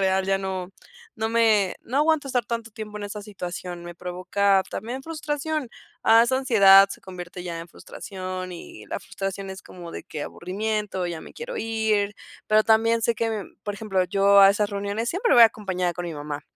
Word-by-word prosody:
real 190 Hz, 0 st, +2 dB
ya 195 Hz, 0 st, +2 dB
no, 190 Hz, -1 st, -4 dB, 0.5 s
no 220 Hz, 0 st, -1 dB
me 220 Hz, -4 st, +3 dB
no 260 Hz, +4 st, -2 dB
aguanto 305 Hz, -2 st, +2 dB
estar 245 Hz, -3 st, 0 dB
tanto 230 Hz, -1 st, -4 dB
tiempo 210 Hz, 0 st, -8 dB
en -, -, -7 dB
esa 205 Hz, +1 st, -6 dB
situación, 180 Hz, -3 st, -6 dB
me 175 Hz, -, -8 dB
provoca 185 Hz, +3 st, +1 dB
también 245 Hz, +5 st, -5 dB
frustración, 305 Hz, -2 st, -3 dB, 0.3 s
ah, 225 Hz, +1 st, +7 dB
esa 260 Hz, +2 st, +1 dB
ansiedad 200 Hz, -6 st, +7 dB
se -, -, -7 dB
convierte 180 Hz, -1 st, -8 dB
ya 170 Hz, -2 st, -4 dB
en 170 Hz, -, -10 dB
frustración, 185 Hz, 0 st, -7 dB
y 110 Hz, -10 st, -10 dB
la -, -, -4 dB
frustración 195 Hz, 0 st, -5 dB
es 190 Hz, 0 st, -8 dB
como 175 Hz, -2 st, -10 dB
de -, -, -6 dB
que 150 Hz, -2 st, -6 dB
aburrimiento, 200 Hz, 0 st, -3 dB
ya 170 Hz, -2 st, -5 dB
me -, -, -13 dB
quiero 485 Hz, +2 st, -6 dB
ir. 220 Hz, -2 st, 0 dB, 0.3 s
Pero 215 Hz, 0 st, +5 dB
también 230 Hz, +1 st, +3 dB
sé 235 Hz, +1 st, +2 dB
que, 230 Hz, +1 st, -1 dB
em, 220 Hz, -3 st, -5 dB
por 205 Hz, -1 st, -3 dB
ejemplo, 195 Hz, -3 st, 0 dB
yo 200 Hz, +2 st, +5 dB
a 195 Hz, -, +9 dB
esas 205 Hz, +1 st, 0 dB
reuniones 205 Hz, +3 st, -2 dB
siempre 390 Hz, +7 st, +2 dB
voy 240 Hz, -, +9 dB
a -, -, +11 dB
acompañada 185 Hz, -5 st, -2 dB
con 175 Hz, 0 st, -5 dB
mi 165 Hz, -, -5 dB
mamá, 145 Hz, 0 st, -5 dB
200 Hz, 200 wpm, -24 LUFS, 185-225 Hz, 0.5 s, a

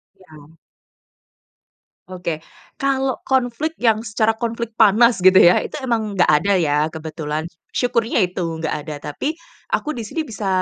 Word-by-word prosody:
Iya. 155 Hz, -6 st, -17 dB, 1.6 s
Oke, 175 Hz, -4 st, -4 dB, 0.4 s
kalau 270 Hz, -2 st, 0 dB
konflik 265 Hz, +4 st, 0 dB
yang 225 Hz, -3 st, +2 dB
secara 220 Hz, 0 st, +2 dB
konflik 235 Hz, -1 st, -3 dB
panas 225 Hz, +1 st, +5 dB
gitu 185 Hz, +1 st, +6 dB
ya, 175 Hz, 0 st, +7 dB
itu -, -, -7 dB
emang 225 Hz, -5 st, -1 dB
nggak 180 Hz, -, +4 dB
ada 200 Hz, 0 st, +2 dB
ya 150 Hz, -4 st, +1 dB
kebetulan, 155 Hz, -1 st, -5 dB, 0.3 s
syukurnya 235 Hz, -3 st, +1 dB
itu 180 Hz, +1 st, -7 dB
nggak 165 Hz, -2 st, -3 dB
ada. 155 Hz, -, -5 dB, 0.2 s
Tapi 300 Hz, -, -3 dB, 0.3 s
aku 305 Hz, -, -1 dB
di 240 Hz, -, -5 dB
sini 320 Hz, +8 st, -3 dB
bisa 215 Hz, -6 st, -5 dB
215 Hz, 140 wpm, -20 LUFS, 170-240 Hz, 1.6 s, ya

